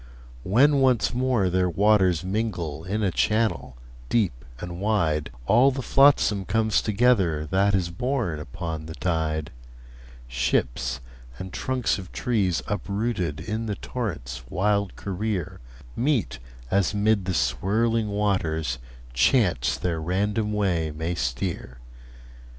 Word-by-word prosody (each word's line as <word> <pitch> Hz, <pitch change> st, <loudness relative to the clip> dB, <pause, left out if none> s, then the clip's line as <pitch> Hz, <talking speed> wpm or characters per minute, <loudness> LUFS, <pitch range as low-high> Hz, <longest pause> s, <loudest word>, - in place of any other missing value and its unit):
When 135 Hz, -, +4 dB
once 130 Hz, -4 st, +3 dB
more 125 Hz, -5 st, +1 dB
their 90 Hz, 0 st, +1 dB
waters 95 Hz, -2 st, +3 dB
mingle 90 Hz, -6 st, -3 dB
In 105 Hz, +3 st, -2 dB
a 95 Hz, -, +1 dB
channel 110 Hz, -, 0 dB, 0.3 s
deep 105 Hz, -, +2 dB, 0.3 s
and 85 Hz, +1 st, -6 dB
wide, 80 Hz, -8 st, +1 dB, 0.2 s
All 120 Hz, -, +5 dB
the 135 Hz, -1 st, -4 dB
flotsam 135 Hz, -9 st, +4 dB
comes 110 Hz, +2 st, +1 dB
together 100 Hz, -9 st, +2 dB
That 100 Hz, +5 st, +2 dB
is 90 Hz, -3 st, 0 dB
borne 115 Hz, -, -2 dB
upon 80 Hz, +1 st, -6 dB
the 80 Hz, -, -7 dB
tide: 80 Hz, -4 st, -1 dB, 0.8 s
Ships, 65 Hz, +1 st, -1 dB, 0.4 s
and 95 Hz, +5 st, -7 dB
trunks 130 Hz, -5 st, -1 dB
of 90 Hz, -2 st, -10 dB
trees, 100 Hz, -8 st, 0 dB
uprooted 100 Hz, -5 st, -2 dB
In 110 Hz, +5 st, -3 dB
the 105 Hz, -, -2 dB
torrent's 80 Hz, -, -5 dB
wild 100 Hz, 0 st, 0 dB
career, 100 Hz, -2 st, -3 dB, 0.4 s
Meet, 120 Hz, -, 0 dB, 0.3 s
as 100 Hz, +1 st, +2 dB
'mid 105 Hz, -1 st, +2 dB
the 95 Hz, -1 st, -1 dB
swirling 105 Hz, -, +1 dB
waters 95 Hz, -8 st, -1 dB, 0.3 s
Chance 85 Hz, -, +2 dB
their 85 Hz, -3 st, -2 dB
random 105 Hz, +5 st, 0 dB
way 90 Hz, -6 st, 0 dB
may 80 Hz, +3 st, -3 dB
steer. 60 Hz, -2 st, -3 dB
95 Hz, 120 wpm, -25 LUFS, 80-110 Hz, 0.8 s, All